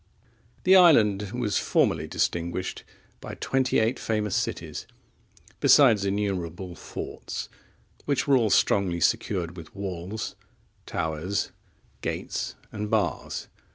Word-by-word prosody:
The 190 +1 +6
island 105 - +6
was 115 -4 0
formerly 80 - +1
distinguished 85 +3 -2 0.4
by - - -7
twenty 130 -1 +1
eight 110 +3 +1
famous 105 -3 -1
cities, - - -3 0.7
besides 115 -9 +6
innumerable 95 -3 -2
forts, - - -6 0.6
which 140 -2 0
were 140 - +5
all 115 -4 +3
strongly 95 -4 +3
secured 85 0 0
with 85 0 -11
walls, 100 +1 -5 0.5
towers, 80 +5 -2 0.5
gates, - - -3 0.2
and 105 0 -4
bars. - - -1
100 Hz, 105 wpm, -26 LUFS, 90-110 Hz, 0.7 s, The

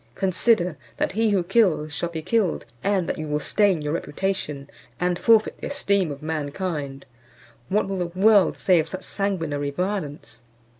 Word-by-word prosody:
Consider, 185 -1 +2 0.2
that - - 0
he 220 +3 +1
who 195 -3 +2
kills 175 -6 +2
shall 170 +2 -2
be 160 -2 -6
killed, 210 - 0 0.2
and 195 -3 +1
that - - -3
you 155 - -4
will 150 0 0
stain 190 -1 +2
your 150 +1 -2
reputation, 155 -5 -3 0.3
and 180 0 0
forfeit 225 -2 +3
the - - -5
esteem 200 - +1
of 140 +1 -8
mankind. 150 -2 -4 0.6
What 205 +1 +1
will 195 -1 -3
the 175 - -1
world 205 -1 +5
say 180 -3 +4
of 160 +1 -1
such 185 +1 -6
sanguinary 165 -8 -2
violence?" 150 - -4
180 Hz, 165 wpm, -24 LUFS, 150-200 Hz, 0.6 s, world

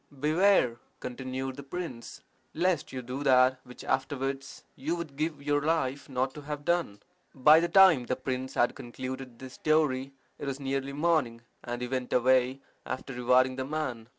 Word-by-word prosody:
"Beware," 155 -4 +3 0.2
continued 130 +1 -5
the - - -6
prince, 135 -4 -7 0.3
"lest 175 -1 0
you 130 -1 -5
do 125 +3 -5
that 130 -2 +4
which 125 -1 -12
afterwards 135 0 -2
you 155 +6 -2
would 165 -5 -6
give 155 0 -3
your 145 0 +1
life 145 -4 -1
not 130 0 -1
to 150 - -9
have 145 0 -6
done." 170 -13 0 0.3
By 150 +4 +7
the 170 - +1
time 170 -9 +6
the 130 - 0
prince 130 0 -4
had 120 - +2
concluded 130 0 -7
this 130 +1 -10
story 140 -4 +1 0.3
it 145 - -5
was 135 0 -3
nearly 135 0 -2
morning, 145 -7 +1 0.2
and 120 0 -4
he - - -2
went 130 0 -3
away, 130 +1 +3 0.2
after 130 +1 -5
rewarding 125 +1 +3
the 130 - -2
man. 130 -6 -4
135 Hz, 170 wpm, -29 LUFS, 130-150 Hz, 0.3 s, By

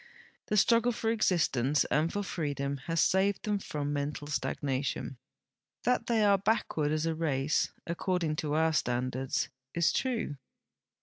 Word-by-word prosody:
The 210 - +1
struggle 230 +3 +4
for 225 -1 -1
exist 180 -10 +2
ence 135 +4 +2
and 155 +2 +1
for 205 - -2
freedom 140 -6 -2
has 165 0 0
saved 195 +3 +2
them 210 -1 0
from 145 -5 -3
mental 145 +1 -3
stagnation. 140 -2 -2 0.7
That 245 -1 +1
the}" 225 -2 +3
are 200 -1 +5
l)ackward 195 -7 0
as 155 +1 0
a 165 - +1
race, 150 -2 0
according 170 -2 -1
to 150 -1 -1
our 160 0 +3
standards, 130 -1 -1 0.3
is 170 -1 +3
true. 235 - -1
160 Hz, 145 wpm, -30 LUFS, 145-200 Hz, 0.7 s, are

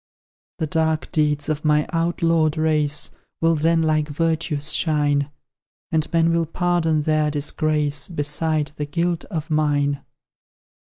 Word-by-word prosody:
The 160 - -1
dark 160 0 -1
deeds 150 -2 +1
of 155 -1 -2
my 150 -1 +2
outlawed 165 -2 +1
race 155 -2 0 0.3
Will 165 0 +3
then 165 +1 +2
like 155 -1 +1
virtues 155 -1 -1
shine; 145 -3 +1 0.6
And 160 -2 0
men 165 0 +3
will 165 -1 +1
pardon 165 -2 +1
their 155 0 +2
disgrace, 150 0 -1
Beside 150 -1 -1
the 150 - -3
guilt 170 +2 -1
of 160 -5 -5
mine. 145 -2 +1
155 Hz, 125 wpm, -22 LUFS, 150-165 Hz, 0.6 s, Will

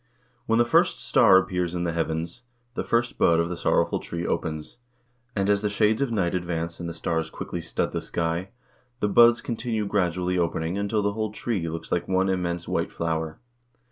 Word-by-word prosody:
When 115 - +3
the 120 - +4
first 120 - +3
star 95 - +5
appears 90 -2 0
in 85 - -1
the 85 - 0
heavens, 80 +5 -2 0.3
the - - -2
first 120 +1 0
bud 85 -1 +4
of 85 0 +1
the 90 - -3
Sorrowful - - +1
Tree 85 0 -5
opens, 80 +2 -3 0.6
and 100 -1 +1
as 100 0 +3
the 105 - 0
shades 105 +3 +2
of 135 -4 0
night 95 -6 0
advance 85 -2 -3
and 85 -1 -4
the - - -5
stars 80 -1 -1
thickly - - -5
stud - - -2
the - - -2
sky, 85 +2 -2 0.5
the 105 - +1
buds 120 +3 +6
continue 115 -2 -2
gradually 90 -2 0
opening 85 0 -1
until 100 +1 0
the 100 0 +1
whole 110 0 -2
tree 105 -6 -2
looks 80 0 -6
like 90 - 0
one 95 0 +2
immense 85 -2 -2
white - - -1
flower. 80 -1 -2
90 Hz, 195 wpm, -25 LUFS, 85-105 Hz, 0.6 s, buds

